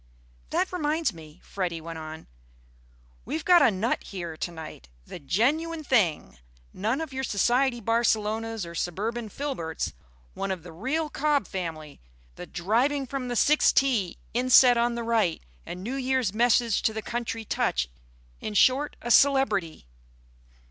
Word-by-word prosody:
"That - - -1
reminds 310 - 0
me," 160 0 -13
Freddy 180 -4 -3
went 165 0 -7
on, 155 0 -8 1.0
"we've 160 - -4
got 355 -1 +7
a - - +6
nut 210 +4 -1
here 170 -4 -6
to 175 - -4
night. 155 - -10 0.2
The - - -9
genuine 305 - 0
thing. 180 - +1 0.3
None 225 +10 -1
of 315 -4 -6
your 265 0 -3
society 245 +3 +1
Barcelonas 225 -1 0
or 170 - -9
suburban 215 +7 -3
Filberts. 200 - -4 0.4
One 195 - -4
of 185 -4 -3
the 175 - -10
real 280 - -2
Cob 295 -1 +1
family; 160 - -6 0.3
the - - -9
driving 245 +10 0
from 265 0 -4
the 245 - -3
sixth 300 +6 +4
tee, 240 -10 +2 0.2
inset 250 +1 +6
on 235 0 +1
the 235 - -3
right, 225 -7 +1 0.2
and 180 +1 -7
New 240 +6 -4
Year's 260 -6 0
message 235 -1 +3
to 220 - +1
the 220 0 -5
country 230 -1 -4
touch. 65 - 0 0.5
In 210 - -5
short, 265 +7 +3
a 240 - -2
celebrity." 220 - +3
225 Hz, 150 wpm, -26 LUFS, 175-265 Hz, 1.0 s, got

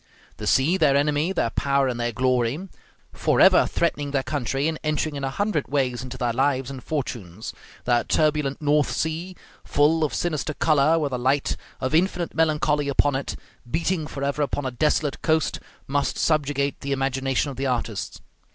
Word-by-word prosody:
The - - -5
sea, 155 +8 +3
their 150 -6 +4
enemy, 150 +4 +2
their 145 -11 0
power, 140 -1 +1
and 120 -2 -2
their 120 0 0
glory, 130 - 0 0.5
forever - - +5
threatening 145 0 -1
their 140 -1 0
country, 140 0 -1
and 160 -1 -2
entering 155 0 -1
in 140 - -5
a 135 - 0
hundred 200 0 -1
ways 130 -3 0
into 130 0 -7
their 120 -2 0
lives 135 0 0
and 130 -2 -8
fortunes; 115 - -4 0.3
that 120 -1 +1
turbulent 150 -3 +1
North 150 0 +2
Sea, 165 +4 -2 0.3
full 155 +2 +2
of 150 - -1
sinister 155 -3 -2
color, 155 +1 +3
with 145 -4 -1
a 125 - -1
light 135 +3 +1 0.2
of 130 +2 -2
infinite 175 +1 +1
melancholy 150 -2 +1
upon 145 +1 +3
it, 135 - -3 0.3
beating 160 +2 -1
forever 140 +1 -2
upon 145 -1 -1
a 130 - -1
desolate 145 +2 0
coast, 160 -1 +1 0.3
must 145 +1 -1
subjugate 145 -3 0
the 140 0 -2
imagination 135 +1 0
of 130 - -10
the 135 +1 -1
artist. 120 -4 -3
140 Hz, 170 wpm, -24 LUFS, 130-155 Hz, 0.5 s, forever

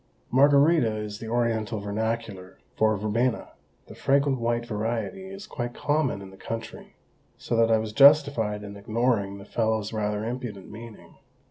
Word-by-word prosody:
Margarita 140 -2 +4
is 105 0 -5
the 115 - -7
Oriental 115 -2 -1
vernacular 105 -2 -4 0.2
for 110 -1 +2
verbena; 115 +4 -1 0.4
the - - -12
fragrant 140 -1 +1
white 120 0 -1
variety 115 - -3
is 195 +2 -9
quite 120 -9 -5
common 145 -9 0
in 95 - -11
the 95 - -15
country; 115 +3 -7 0.4
so - - -3
that 115 0 +4
I 110 - +5
was 110 -1 -4
justified 140 -6 +5
in 100 0 -8
ignoring 110 -1 0
the 100 - -11
fellow's 110 -1 -1
rather 105 0 -2
impudent 120 -5 -6
meaning. 115 +1 -12
115 Hz, 150 wpm, -26 LUFS, 105-125 Hz, 0.4 s, I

